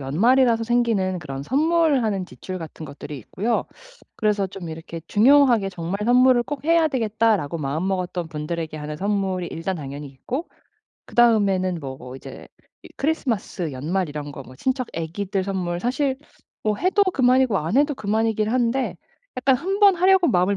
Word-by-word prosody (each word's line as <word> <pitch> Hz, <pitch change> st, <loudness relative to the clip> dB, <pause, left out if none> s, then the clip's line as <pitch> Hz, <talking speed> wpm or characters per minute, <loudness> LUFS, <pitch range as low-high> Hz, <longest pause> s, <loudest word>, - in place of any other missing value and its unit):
연말이라서 230 Hz, -, +3 dB
생기는 225 Hz, -6 st, +1 dB
그런 135 Hz, -5 st, -6 dB
선물하는 275 Hz, -, +1 dB
지출 185 Hz, 0 st, -7 dB
같은 160 Hz, -1 st, -8 dB
것들이 145 Hz, 0 st, -8 dB
있고요. 210 Hz, -, -2 dB, 0.5 s
그래서 210 Hz, -2 st, +1 dB
좀 185 Hz, -2 st, -8 dB
이렇게 165 Hz, +1 st, -7 dB
중요하게 240 Hz, -2 st, +5 dB
정말 180 Hz, +1 st, -4 dB
'선물을 250 Hz, +1 st, +5 dB
꼭 290 Hz, +2 st, -6 dB
해야 330 Hz, 0 st, +4 dB
되겠다.'라고 220 Hz, -, 0 dB
마음먹었던 175 Hz, +4 st, -2 dB
분들에게 155 Hz, +1 st, -4 dB
하는 150 Hz, 0 st, -5 dB
선물이 190 Hz, -1 st, -1 dB
일단 180 Hz, +3 st, -3 dB
당연히 145 Hz, -1 st, -7 dB
있고 250 Hz, -, -5 dB, 0.6 s
그다음에는 200 Hz, -6 st, +3 dB
뭐 130 Hz, -2 st, -8 dB
이제 -, -, -11 dB, 0.3 s
이 -, -, -12 dB
크리스마스 225 Hz, -, -2 dB
연말 165 Hz, +7 st, -2 dB
이런 145 Hz, 0 st, -6 dB
거 140 Hz, -, -8 dB
뭐 130 Hz, 0 st, -14 dB
친척 255 Hz, -, -1 dB
아기들 190 Hz, +4 st, -2 dB
선물 180 Hz, -3 st, -2 dB
사실 260 Hz, +3 st, 0 dB, 0.5 s
뭐 215 Hz, -1 st, 0 dB
해도 380 Hz, -, +2 dB
그만이고 255 Hz, -, +3 dB
안 160 Hz, +9 st, -1 dB
해도 290 Hz, +1 st, +3 dB
그만이긴 215 Hz, 0 st, 0 dB
한데 250 Hz, +2 st, 0 dB, 0.4 s
약간 260 Hz, +1 st, +3 dB
1 385 Hz, +9 st, -2 dB
번 400 Hz, -2 st, +7 dB
하려고 370 Hz, 0 st, +4 dB
마음을 185 Hz, +2 st, +2 dB
200 Hz, 360 characters per minute, -23 LUFS, 165-255 Hz, 0.6 s, 번